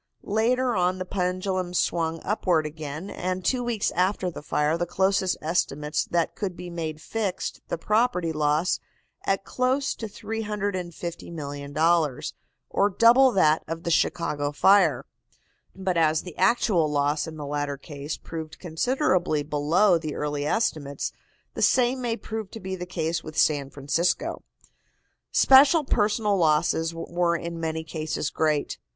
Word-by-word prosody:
Later 240 Hz, +4 st, +1 dB
on 180 Hz, 0 st, +1 dB
the 185 Hz, -, -4 dB
pendulum 185 Hz, 0 st, -2 dB
swung 165 Hz, -2 st, 0 dB
upward 180 Hz, -6 st, +1 dB
again, 155 Hz, +4 st, -6 dB
and 185 Hz, 0 st, -3 dB
two 255 Hz, -2 st, +1 dB
weeks 235 Hz, -4 st, 0 dB
after 185 Hz, +1 st, 0 dB
the -, -, -8 dB
fire 150 Hz, +1 st, 0 dB
the 175 Hz, +1 st, -2 dB
closest 190 Hz, +1 st, +1 dB
estimates 150 Hz, -2 st, 0 dB
that 170 Hz, -1 st, 0 dB
could 190 Hz, -4 st, -4 dB
be 175 Hz, 0 st, -7 dB
made 160 Hz, -2 st, -4 dB
fixed 200 Hz, +2 st, -3 dB
the -, -, -2 dB
property 210 Hz, -3 st, +1 dB
loss 150 Hz, +2 st, +1 dB, 0.5 s
at 195 Hz, 0 st, +1 dB
close 260 Hz, +4 st, 0 dB
to 225 Hz, -, -6 dB
$350,000,000, 170 Hz, -, -2 dB, 0.4 s
or 200 Hz, -, +3 dB
double 240 Hz, +6 st, +6 dB
that 155 Hz, -4 st, +3 dB
of 165 Hz, +1 st, -5 dB
the 170 Hz, -, -1 dB
Chicago 145 Hz, -3 st, 0 dB
fire. 170 Hz, -3 st, +4 dB, 0.7 s
But 190 Hz, -2 st, -1 dB
as 160 Hz, -1 st, +3 dB
the 180 Hz, -4 st, -9 dB
actual 190 Hz, -5 st, +2 dB
loss 145 Hz, +1 st, +1 dB
in 160 Hz, -1 st, -8 dB
the 150 Hz, -, -6 dB
latter 145 Hz, 0 st, -2 dB
case 145 Hz, +1 st, -6 dB
proved 160 Hz, -1 st, -7 dB
considerably 180 Hz, -, 0 dB
below 155 Hz, +6 st, +3 dB
the 155 Hz, -2 st, -5 dB
early 145 Hz, -1 st, -2 dB
estimates, 145 Hz, -9 st, -1 dB, 0.4 s
the -, -, -5 dB
same 255 Hz, +1 st, +3 dB
may 235 Hz, -2 st, -1 dB
prove 220 Hz, -4 st, -6 dB
to 225 Hz, -, -9 dB
be 190 Hz, -1 st, -4 dB
the 180 Hz, -1 st, -6 dB
case 165 Hz, -2 st, -2 dB
with 155 Hz, -1 st, -9 dB
San 145 Hz, -3 st, +2 dB
Francisco. 145 Hz, +6 st, -1 dB, 0.9 s
Special 280 Hz, +4 st, +6 dB
personal 210 Hz, -4 st, +1 dB
losses 160 Hz, 0 st, +2 dB
were 170 Hz, +1 st, -1 dB
in 170 Hz, 0 st, -5 dB
many 160 Hz, 0 st, -2 dB
cases 155 Hz, -2 st, -3 dB
great. 155 Hz, -2 st, 0 dB
170 Hz, 145 wpm, -25 LUFS, 155-200 Hz, 0.9 s, double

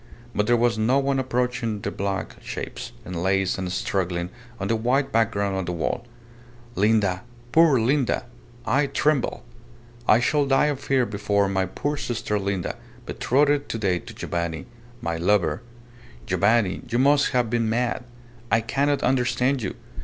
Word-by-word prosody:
But 105 Hz, -, 0 dB
there 120 Hz, 0 st, +4 dB
was 115 Hz, -1 st, +2 dB
no 120 Hz, +5 st, +3 dB
one 140 Hz, -1 st, +1 dB
approaching 125 Hz, -4 st, -1 dB
their -, -, -3 dB
black 100 Hz, 0 st, -3 dB
shapes, -, -, -6 dB
enlaced 95 Hz, +1 st, 0 dB
and 90 Hz, -1 st, -3 dB
struggling 90 Hz, -1 st, -1 dB, 0.3 s
on 95 Hz, -, -2 dB
the 115 Hz, -, +2 dB
white 130 Hz, +5 st, +1 dB
background 100 Hz, -3 st, +1 dB
of 95 Hz, -2 st, -2 dB
the 90 Hz, -, -2 dB
wall. 85 Hz, +8 st, -2 dB, 0.7 s
"Linda! 100 Hz, -3 st, +2 dB, 0.3 s
Poor 160 Hz, -5 st, +5 dB
Linda! 130 Hz, +1 st, +1 dB, 0.4 s
I 140 Hz, +1 st, +2 dB
tremble! 145 Hz, -2 st, 0 dB, 0.6 s
I 110 Hz, -, +6 dB
shall 145 Hz, +3 st, +2 dB
die 135 Hz, +1 st, +4 dB
of 135 Hz, -, -8 dB
fear 135 Hz, -2 st, +1 dB
before 100 Hz, -1 st, 0 dB
my 95 Hz, -1 st, 0 dB
poor 145 Hz, +10 st, -3 dB
sister 115 Hz, -6 st, -2 dB
Linda, 95 Hz, -2 st, -2 dB, 0.3 s
betrothed 145 Hz, +2 st, +1 dB
to -, -, -2 dB
day 95 Hz, -5 st, +1 dB
to -, -, -11 dB
Giovanni 85 Hz, -2 st, -3 dB, 0.4 s
my 85 Hz, -1 st, -1 dB
lover! 90 Hz, -1 st, +2 dB, 0.6 s
Giovanni, 100 Hz, +1 st, +2 dB
you 120 Hz, -, 0 dB
must 140 Hz, +2 st, +4 dB
have 120 Hz, -3 st, 0 dB
been 115 Hz, -2 st, +1 dB
mad! 120 Hz, +2 st, 0 dB, 0.5 s
I 115 Hz, -, +4 dB
cannot 140 Hz, +5 st, 0 dB
understand 125 Hz, +1 st, +1 dB
you! 95 Hz, -, -3 dB
115 Hz, 155 wpm, -24 LUFS, 95-130 Hz, 0.7 s, I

